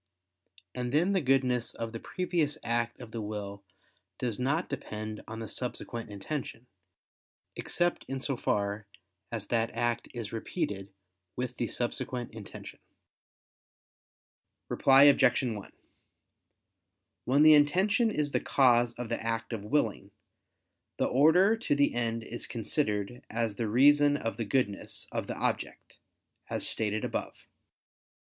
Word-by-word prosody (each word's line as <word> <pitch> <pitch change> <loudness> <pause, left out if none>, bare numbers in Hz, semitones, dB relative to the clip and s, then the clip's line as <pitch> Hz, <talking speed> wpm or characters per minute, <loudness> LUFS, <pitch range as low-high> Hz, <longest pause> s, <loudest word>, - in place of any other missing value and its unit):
And 125 -1 -3
then 170 +8 +3
the 190 - +2
goodness 130 -3 +1
of 115 -1 -4
the 115 - -6
previous 170 -4 -1
act 120 0 -1
of 110 - -10
the 115 - -4
will 100 -1 -6 0.5
does 120 -3 -2
not 140 +7 0
depend 110 -6 -5
on 110 - -6
the 110 - -5
subsequent 120 -1 -4
intention, 115 +4 -5 0.9
except 175 0 0
in 135 0 -3
so 135 +1 -1
far 105 -2 -1 0.4
as 110 -4 -3
that 115 -1 +1
act 120 0 -1
is 115 -4 -6
repeated 100 -3 -3 0.4
with 125 0 -4
the 120 - -1
subsequent 120 0 -2
intention. 110 -3 -10 1.9
Reply 135 +1 +6
Obj. 135 -3 +5
1: 110 -5 -4 1.5
When 140 +4 +4
the 155 0 +9
intention 190 +11 +4
is 150 -8 -1
the - - +1
cause 120 -3 +3
of 120 -1 -5
the - - -3
act 115 +1 -2
of 110 - -3
willing, 110 -6 0 0.9
the - - +1
order 170 - +5
to 220 -10 0
the 145 0 +3
end 115 -1 -1
is 120 - -6
considered 115 -1 -2
as 115 -2 -1
the 115 - -1
reason 145 +5 +5
of 115 -5 -4
the 115 - -2
goodness 100 -3 -1
of - - -3
the - - -5
object, - - -3 0.5
as - - 0
stated 105 -1 0
above. - - -3
120 Hz, 135 wpm, -30 LUFS, 110-145 Hz, 1.9 s, the